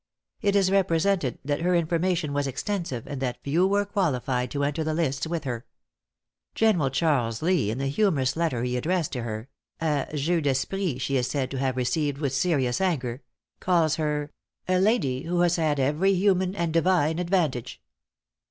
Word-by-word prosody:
It 200 0 +2
is 195 -2 +3
represented 180 -5 +1
that 145 +2 -1
her 180 +1 +2
information 170 -1 0
was 145 0 0
extensive, 135 - -3
and 140 -2 -6
that 125 -2 -2
few 165 +7 +2
were 205 +1 +1
qualified 130 -10 -1
to 140 +2 -2
enter 150 +3 -1
the 155 0 -1
lists 140 -3 -1
with 165 -1 -3
her. 120 -4 -4 0.9
General 190 -11 +3
Charles 135 -4 0
Lee 170 - +2
in 110 - -2
the 135 - -2
humorous 140 -5 +1
letter 160 -8 0
he 125 0 -1
addressed 170 +4 0
to 125 - -3
her 110 0 -5 0.3
a 150 -4 0
jeu 165 +4 +1
d'esprit 145 +3 -1
she 135 +1 0
is 125 -1 0
said 130 -1 -2
to 135 - -3
have 130 -1 -1
received 145 +3 0
with 140 -3 -2
serious 135 -3 +1
anger 135 -9 -1 0.4
calls 170 -4 +2
her 150 -1 -1 0.4
"a 185 0 +2
lady 185 - +1
who 175 +1 0
has 175 0 +3
had 155 -3 +1
every 155 +9 +2
human 185 0 +2
and 170 -4 -1
divine 165 -2 +2
advantage." 160 -9 -1
155 Hz, 175 wpm, -26 LUFS, 135-180 Hz, 0.9 s, is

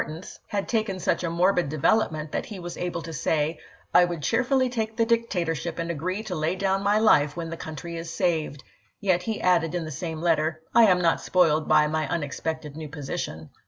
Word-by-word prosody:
tance 160 +5 -9
had 200 -1 -2
taken 215 -5 -1
such 180 - 0
a 170 - 0
morbid 175 -1 +2
development 155 0 +1
that - - -3
he 210 - -7
was 175 -1 -6
able 175 -2 -3
to 165 - -7
say: 155 +1 0 0.3
"I 180 - +7
would 170 -4 -2
cheerfully 255 - +2
take 225 -3 -3
the 230 - +3
dictatorship 190 - -1
and 170 0 -2
agree 185 +6 -3
to 215 -4 -5
lay 160 +1 0
down 195 0 0
my 205 +1 +3
life 150 -9 +4
when 165 -1 -4
the - - -3
country 165 +1 -7
is 165 0 -6
saved 160 -5 -1 0.2
"; - - -41
yet 185 -4 +2
he 220 +3 -3
added 175 -2 +2
in 170 -2 -2
the 155 - -6
same 160 +2 -4
la^s'^own 160 - -7
letter, 160 -1 +1
" - - -39
I 230 - +7
am 180 -3 +4
not 165 -1 +2
spoiled 160 -4 +2
by 150 - +5
my 155 0 -1
unexpected 155 0 -3
new 155 0 -6
^K'. - - -21
position." 80 - -5
170 Hz, 225 wpm, -26 LUFS, 155-195 Hz, 0.3 s, I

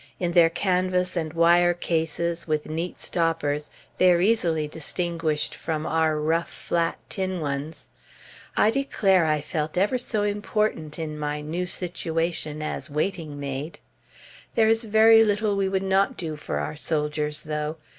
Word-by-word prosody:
In 175 -2 0
their 170 -1 +6
canvas 180 +1 0
and 160 -3 -2
wire 175 +1 +4
cases, 170 0 -2
with 155 -1 0
neat 165 +3 -4
stoppers, 155 -3 -1 0.3
they 185 0 +6
are 175 - +4
easily 175 -6 +2
distinguished 160 0 -2
from 155 -1 -3
our 160 -1 +1
rough, 165 +2 0
flat, 170 -1 -1
tin 190 -2 -2
ones. 145 +1 -4 0.7
I 215 - +5
declare 195 -9 +2
I 155 -1 +1
felt 155 +2 -3
ever 205 +7 +2
so 215 -3 -1
important 205 -6 -1
in 155 -2 -5
my 150 0 -2
new 170 +4 -3
situation 165 -3 -2
as 155 - -4
waiting 155 -1 -2
maid! 140 +3 -5 0.8
There 225 -1 +4
is 225 +1 +2
very 225 +1 +6
little 210 -1 +1
we 195 -1 +1
would 190 0 0
not 195 +1 +2
do 160 -4 -4
for 150 - -4
our 75 +1 -3
soldiers, 150 -1 -2
though. 150 +1 -3
165 Hz, 150 wpm, -25 LUFS, 155-185 Hz, 0.8 s, their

